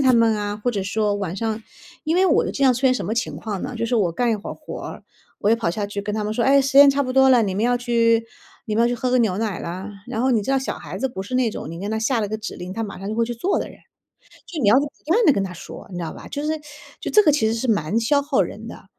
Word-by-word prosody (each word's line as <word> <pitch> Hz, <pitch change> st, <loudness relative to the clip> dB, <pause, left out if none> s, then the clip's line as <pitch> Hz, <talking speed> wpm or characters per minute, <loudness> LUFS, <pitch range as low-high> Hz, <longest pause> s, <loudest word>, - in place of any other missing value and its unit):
他 260 Hz, -2 st, +5 dB
们 230 Hz, -2 st, +4 dB
啊。 205 Hz, 0 st, -3 dB
或 230 Hz, +4 st, -1 dB
者 200 Hz, -5 st, -3 dB
说 205 Hz, +1 st, 0 dB
晚 190 Hz, -4 st, -3 dB
上 220 Hz, +2 st, -2 dB, 0.4 s
因 315 Hz, -, 0 dB
为 370 Hz, +2 st, +4 dB
我 335 Hz, -, +3 dB
的 -, -, -3 dB
经 275 Hz, -, -3 dB
常 260 Hz, -2 st, +6 dB
出 245 Hz, -, -4 dB
现 260 Hz, -1 st, +4 dB
什 -, -, -3 dB
么 215 Hz, -, -2 dB
情 230 Hz, -, -2 dB
况 205 Hz, -4 st, -5 dB
呢？ -, -, -5 dB
就 230 Hz, -, -1 dB
是 240 Hz, +1 st, 0 dB
我 180 Hz, -6 st, +1 dB
干 240 Hz, +4 st, +1 dB
一 220 Hz, -, +1 dB
会 205 Hz, -, -8 dB
儿 -, -, -5 dB
活， -, -, -8 dB, 0.4 s
我 205 Hz, -, +2 dB
也 230 Hz, -, +4 dB
跑 225 Hz, -7 st, -1 dB
下 205 Hz, +5 st, -2 dB
去 200 Hz, 0 st, -4 dB
跟 210 Hz, +1 st, -4 dB
他 215 Hz, -, -1 dB
们 210 Hz, -, -2 dB
说 235 Hz, +1 st, 0 dB
“哎， 275 Hz, 0 st, +5 dB
时 270 Hz, -, -1 dB
间 285 Hz, -, +10 dB
差 275 Hz, +1 st, +3 dB
不 255 Hz, -1 st, -3 dB
多 265 Hz, 0 st, +5 dB
了， 245 Hz, -3 st, +5 dB
你 195 Hz, -2 st, -1 dB
们 215 Hz, -, +1 dB
要 245 Hz, +1 st, +3 dB
去 230 Hz, -2 st, +2 dB, 0.4 s
你 215 Hz, -, -3 dB
们 230 Hz, -, +4 dB
要 235 Hz, -, +4 dB
去 245 Hz, -, 0 dB
喝 250 Hz, +1 st, -2 dB
个 255 Hz, -, +3 dB
牛 210 Hz, -6 st, +2 dB
奶 215 Hz, -5 st, -2 dB
啦。” 185 Hz, +4 st, -6 dB, 0.2 s
然 220 Hz, -, -3 dB
后 260 Hz, -, +2 dB
你 230 Hz, -, +3 dB
知 270 Hz, -, -3 dB
道 270 Hz, -, +3 dB
小 265 Hz, -, -4 dB
孩 -, -, -8 dB
子 265 Hz, -, 0 dB
不 215 Hz, -7 st, -7 dB
是 205 Hz, -, -7 dB
那 250 Hz, -3 st, +2 dB
种 155 Hz, -, -7 dB
你 165 Hz, -, -7 dB
跟 200 Hz, -, -3 dB
他 220 Hz, -, -1 dB
下 235 Hz, +1 st, +1 dB
了 210 Hz, -, -2 dB
个 220 Hz, -, -2 dB
指 220 Hz, -, -6 dB
令， 180 Hz, +1 st, -7 dB
他 225 Hz, -, -3 dB
马 200 Hz, -, -7 dB
上 195 Hz, -, -6 dB
就 215 Hz, -, -2 dB
会 230 Hz, -, +2 dB
去 240 Hz, -, -4 dB
做 355 Hz, -, 0 dB
的 -, -, -4 dB
人。 -, -, -13 dB, 0.7 s
就 325 Hz, -4 st, -5 dB
你 205 Hz, -, +4 dB
要 215 Hz, -, +6 dB
不 290 Hz, -, 0 dB, 0.2 s
断 430 Hz, +8 st, +3 dB
地 300 Hz, -, +7 dB
跟 200 Hz, -, 0 dB
他 190 Hz, -, -6 dB
说， 175 Hz, -, -10 dB
你 180 Hz, -, -6 dB
知 170 Hz, -, -3 dB
道 -, -, -5 dB
吧。 -, -, -11 dB
就 285 Hz, -, -4 dB
是 310 Hz, +1 st, -1 dB, 0.4 s
就 -, -, -4 dB
这 425 Hz, -, +6 dB
个 300 Hz, -, +5 dB
其 280 Hz, -6 st, +2 dB
实 225 Hz, -, 0 dB
是 230 Hz, +3 st, -2 dB
蛮 200 Hz, 0 st, +1 dB
消 285 Hz, +5 st, +2 dB
耗 280 Hz, -2 st, +2 dB
人 -, -, -7 dB
的。 -, -, -10 dB
230 Hz, 355 characters per minute, -22 LUFS, 205-255 Hz, 0.7 s, 间